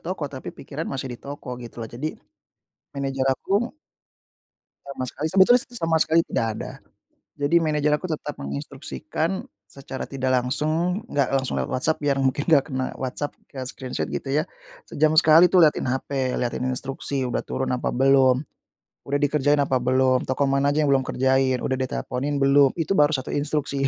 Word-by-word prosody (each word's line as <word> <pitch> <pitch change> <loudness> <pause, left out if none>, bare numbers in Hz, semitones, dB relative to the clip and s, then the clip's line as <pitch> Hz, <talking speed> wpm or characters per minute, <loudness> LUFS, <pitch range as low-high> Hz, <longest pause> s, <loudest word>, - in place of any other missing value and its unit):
toko 170 -3 -4
tapi 135 -2 -7
pikiran 155 +3 -6
masih 135 -2 -4
di 120 - -9
toko 140 -2 -9
gitu 120 0 -10
loh, - - -8
jadi 150 +7 -4 0.8
manager 135 -1 -2
aku 205 - -1 1.1
Sama 140 -2 -4
sekali 155 - -4
sebetulnya 195 +6 +6
s 275 - -3
sama 165 -4 +1
sekali 160 +1 +4
tidak 115 - -1
ada. - - -6 0.6
Jadi 145 +4 +1
manajer 150 -2 +1
aku 185 - -5
tetap 150 -3 -4
menginstruksikan 70 - -4 0.4
secara 135 -1 -7
tidak 130 -1 -2
langsung. 155 - 0
Enggak 140 -3 +1
langsung 130 -1 0
lewat - - -2
WhatsApp 155 +5 +1
biar 145 -2 +1
mungkin 135 +2 +1
enggak 145 -4 +5
kena 130 0 -3
WhatsApp 130 +3 -4 0.2
ke 135 - -7
screenshot 130 -1 -4
gitu - - -5
ya. 150 +3 +1 0.4
Sejam 155 +1 +2
sekali 165 +2 +7
itu 185 - +4
lihatin 155 -4 +4
HP, 130 -1 -2
lihatin 125 0 -2
instruksi 135 +1 -2
udah 120 - -2
turun 130 - -3
apa 125 - -1
belum. 135 +1 +4 0.6
Udah 140 - +1
dikerjain 145 0 +2
apa 135 -2 +2
belum, 130 0 +2
toko 130 +2 +1
mana 140 +1 +2
aja 150 +2 +1
yang - - +1
belum 135 -1 +4
kerjain, 130 0 +1
udah 130 - 0
diteleponin 130 +2 -2
belum? 140 0 +5
Itu 165 +3 0
baru 150 -5 +5
1 130 - -4
instruksi. 145 -1 -1
140 Hz, 170 wpm, -24 LUFS, 130-150 Hz, 1.1 s, sekali